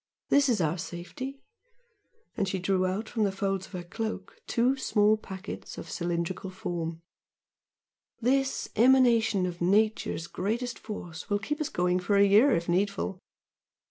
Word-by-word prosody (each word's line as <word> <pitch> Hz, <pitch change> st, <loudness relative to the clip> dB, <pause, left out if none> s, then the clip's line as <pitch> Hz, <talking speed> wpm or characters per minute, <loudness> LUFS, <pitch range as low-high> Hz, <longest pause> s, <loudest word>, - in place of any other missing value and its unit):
This 280 Hz, -1 st, +4 dB
is 230 Hz, -4 st, +2 dB
our 165 Hz, +1 st, 0 dB
safety" 220 Hz, +13 st, -7 dB, 0.9 s
and 200 Hz, -5 st, 0 dB
she 190 Hz, -, -1 dB
drew 185 Hz, 0 st, +1 dB
out 200 Hz, +4 st, -2 dB
from 220 Hz, -, -1 dB
the 200 Hz, -, +2 dB
folds 195 Hz, -1 st, -2 dB
of -, -, -21 dB
her 180 Hz, -1 st, -4 dB
cloak, 225 Hz, -, -5 dB
two 250 Hz, +2 st, +2 dB
small 215 Hz, -5 st, +3 dB
packets 195 Hz, -2 st, -8 dB
of -, -, -7 dB
cylindrical 175 Hz, +2 st, -2 dB
form 170 Hz, -3 st, -4 dB, 1.2 s
"This 270 Hz, +3 st, +1 dB
emanation 235 Hz, -5 st, +4 dB
of 175 Hz, -1 st, -5 dB
Nature's 205 Hz, -2 st, +2 dB
greatest 225 Hz, +8 st, -3 dB
force 175 Hz, -6 st, -7 dB
will 205 Hz, -, +2 dB
keep 295 Hz, +10 st, -3 dB
us 305 Hz, -, -1 dB
going 180 Hz, +1 st, +1 dB
for 200 Hz, +3 st, 0 dB
a 200 Hz, 0 st, +6 dB
year 210 Hz, +8 st, +6 dB
if 170 Hz, -7 st, +1 dB
needful! 190 Hz, +1 st, 0 dB
200 Hz, 150 wpm, -28 LUFS, 180-230 Hz, 1.2 s, a